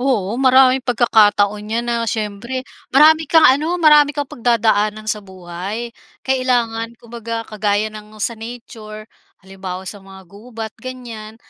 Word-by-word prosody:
Oo, 235 -5 0
maraming 260 0 +5
pagkakataon 210 -4 +3
niyan 230 +2 -2
na 235 -1 0
siyempre, 225 +4 -4 0.3
marami 315 +3 +6
kang 320 -2 +5
ano, 310 +7 +1
marami 300 -2 +6
kang 285 -2 -3
pagdadaanan 215 -3 0
sa 210 -1 -1
buhay. 190 +5 -7 0.3
Kailangan 235 -3 -1
kumbaga 230 -1 -6
kagaya 210 0 -1
ng 215 0 -12
sa 235 - -1
nature, 220 -2 -10 0.4
halimbawa 190 -1 -7
sa 205 - -9
mga 190 0 -14
gubat 220 +2 -9
ganyan, 235 -4 -9
225 Hz, 130 wpm, -18 LUFS, 210-255 Hz, 0.4 s, marami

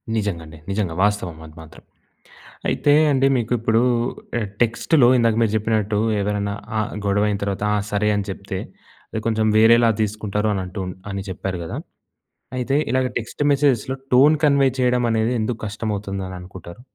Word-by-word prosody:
నిజంగా 100 -6 -2
అండి. 80 +1 -12
నిజంగా 100 -4 -1
వాస్తవం 100 -5 0
అది 80 0 -14
మాత్రం. 80 -1 -14 0.9
అయితే 145 - +2 0.2
అండి 135 0 +3
మీకు 120 -1 -2
ఇప్పుడు 115 0 +2 0.6
ఆహ్, 110 - -2 0.2
టెక్స్ట్‌లో 120 +3 +3
ఇందాక 115 -2 +3
మీరు 110 -2 +1
చెప్పినట్టు, 110 -1 0 0.2
ఎవరైనా 100 0 -1 0.2
ఆహ్, 110 - -2
గొడవ 100 +1 +2
అయిన 100 -1 -1
తర్వాత 100 0 -2
ఆహ్, 105 -1 +1
సరే 105 +1 +1
అని 100 -1 -2
చెప్తే. 95 0 -5 0.5
అది 110 - -2
కొంచెం 110 -1 +1
వేరేలా 115 +1 +6
తీసుకుంటారు 105 0 -1
అని 95 -2 -1
అంటూ 95 +2 -7 0.3
అని 100 0 -4
చెప్పారు 95 0 -4
గదా! 80 - -6 0.8
అయితే, 130 +2 0
ఇలాగ 130 0 +2
టెక్స్ట్ 120 +5 -6
మెసేజెస్‍లో 135 -3 +1 0.2
టోన్ 140 +5 +6
కన్వే 140 -2 +4
చేయడం 125 -1 +2
అనేది 110 +1 +1
ఎందుకు 110 +1 -2
కష్టమవుతుందని 100 -3 -4
అనుకుంటారు? 90 +1 -11
105 Hz, 155 wpm, -21 LUFS, 100-115 Hz, 0.9 s, వేరేలా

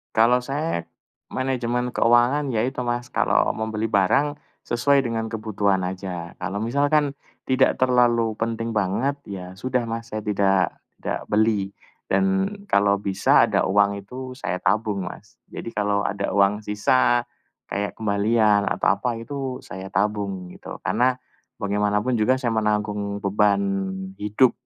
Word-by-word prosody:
Kalau 120 +2 +4
saya 140 - -2 0.5
manajemen 125 -2 -1
keuangan 125 +4 +3
ya 115 +2 +1
itu 130 -1 -3
Mas, 120 0 -2
kalau - - +2
membeli 110 0 -2
barang 110 +9 +2 0.3
sesuai 140 +4 +3
dengan 115 -1 -3
kebutuhan 105 -3 0
saja. 90 -2 -6
Kalau 95 +2 -4
misalkan 140 +4 +1 0.3
tidak 130 0 +3
terlalu 120 -3 +3
penting 115 0 -3
banget, 105 +8 0
ya 95 -2 -8
sudah 125 +3 -1
Mas, 115 0 -5
saya 110 - -2
tidak 100 -2 +1 0.2
tidak - - -3
beli. 105 -2 +2 0.4
Dan 195 +1 +2 0.2
kalau 100 0 +3
bisa 100 -1 +3
ada - - +1
uang 100 0 +2
itu, 130 +4 -8
saya 90 -9 -3
tabung 105 -3 0
Mas. 105 +5 -11
Jadi, 115 - -7
kalau 105 -1 0
ada 100 - -2
uang 100 +1 +3
sisa 120 +3 +2 0.5
kayak 100 0 -2
kembalian 105 -1 +2
atau - - 0
apa 120 0 -1
itu 130 +2 -5
saya 95 +1 -8
tabung, 100 -2 -2
gitu. - - -9
Karena 125 +1 +2 0.4
bagaimanapun 105 +4 0
juga 125 +5 +3
saya 125 -3 -1
menanggung 105 -2 -1
beban 100 0 +2 0.6
hidup 105 +5 +3
110 Hz, 135 wpm, -23 LUFS, 100-125 Hz, 0.6 s, Kalau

